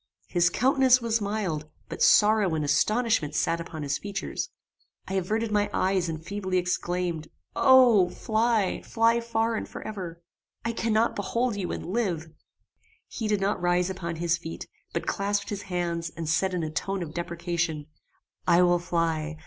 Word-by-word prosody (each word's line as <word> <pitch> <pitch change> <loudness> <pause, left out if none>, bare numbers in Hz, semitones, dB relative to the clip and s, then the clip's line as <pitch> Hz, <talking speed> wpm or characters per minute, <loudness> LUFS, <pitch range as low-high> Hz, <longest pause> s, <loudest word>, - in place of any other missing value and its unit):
His 175 -1 +2
countenance 260 +3 +4
was 230 -2 0
mild, 195 -7 -2 0.2
but - - -7
sorrow 210 -5 +5
and 155 -1 -1
astonishment 210 +1 +1
sat 170 +2 +1
upon 160 -2 -7
his 140 0 -1
features. 200 -1 -4 0.6
I 190 - -5
averted 215 +4 -1
my 205 0 +2
eyes 185 -2 +1
and 160 0 -6
feebly 190 -1 -2
exclaimed 175 -2 -1 0.3
"O! 245 -8 +6
fly 220 -2 0
fly 230 0 +2
far 230 0 0
and - - -4
for - - -8
ever! 175 -5 -7 0.4
I 230 - +1
cannot 225 0 +1
behold 230 +4 -1
you 190 -3 -3
and - - -5
live!" 175 -6 -2 0.8
He 225 - -4
did 210 -2 +1
not 195 -1 0
rise 175 +1 +2
upon 170 -3 -4
his 170 +1 0
feet, 165 - -7 0.2
but - - -3
clasped 200 0 -1
his 205 -1 -4
hands, 175 -3 -2
and 160 0 -6
said 180 +4 +1
in 175 - -1
a 155 - -3
tone 195 +4 -2
of 155 -2 -8
deprecation 170 -2 -2 0.6
"I 175 +1 +6
will 175 0 +4
fly. 165 -2 -1
185 Hz, 165 wpm, -27 LUFS, 170-215 Hz, 0.8 s, O